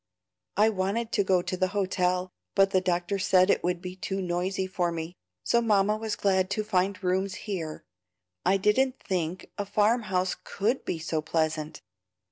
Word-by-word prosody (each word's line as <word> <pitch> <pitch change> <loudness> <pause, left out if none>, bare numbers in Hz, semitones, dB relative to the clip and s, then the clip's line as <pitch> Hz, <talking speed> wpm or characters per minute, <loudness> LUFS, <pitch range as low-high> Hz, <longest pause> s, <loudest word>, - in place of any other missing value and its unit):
"I 215 +2 +5
wanted 215 +3 -1
to 205 - +2
go 185 -2 +2
to 185 - -2
the 185 0 +1
hotel, 185 -1 0 0.2
but 195 -1 +4
the 185 - +3
doctor 180 +2 0
said 185 0 +4
it - - +1
would 180 0 -1
be 180 0 -6
too 195 +1 -3
noisy 185 +1 -1
for 180 -2 -1
me, 165 +1 -5 0.3
so 235 - +3
Mamma 210 -2 +3
was 215 -1 -3
glad 190 -2 +2
to 215 - 0
find 190 -1 0
rooms 190 +1 0
here. 170 -7 -4 0.6
I 190 +2 +3
didn't 255 +7 +2
think 180 -1 -3
a 205 - -1
farm 215 +4 +3
house 185 0 +1
COULD 225 +6 -1
be - - -2
so 160 -1 -2
pleasant. 155 -1 -2
185 Hz, 175 wpm, -28 LUFS, 180-200 Hz, 0.6 s, I